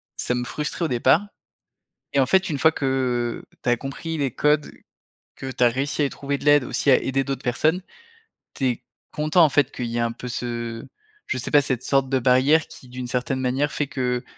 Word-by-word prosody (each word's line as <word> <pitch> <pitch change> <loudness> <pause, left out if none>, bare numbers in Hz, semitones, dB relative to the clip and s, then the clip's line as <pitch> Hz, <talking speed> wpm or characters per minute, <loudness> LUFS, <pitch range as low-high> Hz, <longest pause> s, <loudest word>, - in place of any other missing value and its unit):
ça - - -1
me 125 - -1
frustrait 150 +6 -3
au - - +1
départ 130 +10 +3 0.9
et - - +1
en 130 - +3
fait 190 +7 +3
une 145 - -2
fois 160 +3 +4
que 130 -4 -1 0.2
tu - - -3
as 120 - +3
compris 140 +6 -5
les 140 -2 0
codes, 150 +2 +1 0.7
que 135 - -6
tu 125 - -3
as - - +7
réussi 135 +5 -2
à - - +4
y - - -4
trouver 140 0 -3
de - - -11
l'aide, 145 -2 +6
aussi 140 - 0
à - - +8
aider 135 0 0
d'autres 135 -1 -4
personnes, 155 +9 +1 0.7
tu 135 - -1
es 120 -2 -2 0.3
content 155 +3 +3
en 150 - +3
fait 145 +1 +2
qu'il 125 - -4
y 115 - -3
ait - - +1
un 115 0 0
peu 125 - -8
ce 120 -1 -4 0.4
je 130 - -1
sais 120 - -4
pas, 145 - +6
cette 130 -3 -2
sorte 135 -1 +2
de 135 - +2
barrière 130 +5 +4
qui 130 - -13
d'une 125 0 -6
certaine 125 +2 -1
manière 135 +3 0
fait 145 - -1
que, 125 -3 -2
135 Hz, 225 wpm, -23 LUFS, 125-145 Hz, 0.9 s, à